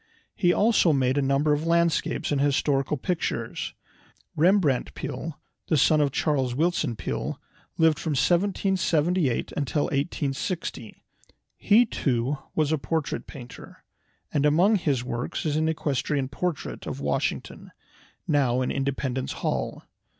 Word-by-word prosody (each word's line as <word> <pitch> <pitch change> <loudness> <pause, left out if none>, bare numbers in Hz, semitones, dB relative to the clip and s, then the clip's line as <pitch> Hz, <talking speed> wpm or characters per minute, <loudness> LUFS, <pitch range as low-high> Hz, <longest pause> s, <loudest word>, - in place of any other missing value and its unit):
He 175 -3 +3
also 205 -3 +4
made 130 -1 +2
a - - +2
number 140 +2 +2
of 150 +3 -1
landscapes 170 -2 +1
and 140 -2 +1
historical 140 0 +1
pictures. 175 +6 -3 0.6
Rembrandt 165 -5 +2
Peale, 160 -1 -5 0.3
the 155 - +2
son 155 +3 +4
of 145 -1 +2
Charles 135 -4 0
Willson 155 -4 0
Peale, - - -4 0.4
lived 160 -2 +4
from 160 - -2
1778 175 - +1
until 145 +1 0
1860. 140 - -3 0.5
He 220 +4 +4
too 135 - -1 0.2
was 155 -1 +1
a 155 - +1
portrait 155 +3 -2
painter, 125 -3 -11 0.5
and 145 - +2
among 175 +9 +4
his 140 -9 0
works 120 +4 -4
is 150 -2 0
an 160 +1 +1
equestrian 145 -3 -1
portrait 165 +1 -4
of - - -4
Washington, - - -3 0.6
now 130 -4 +2
in - - -1
Independence 135 -1 -2
Hall. - - -3
150 Hz, 130 wpm, -26 LUFS, 135-165 Hz, 0.6 s, also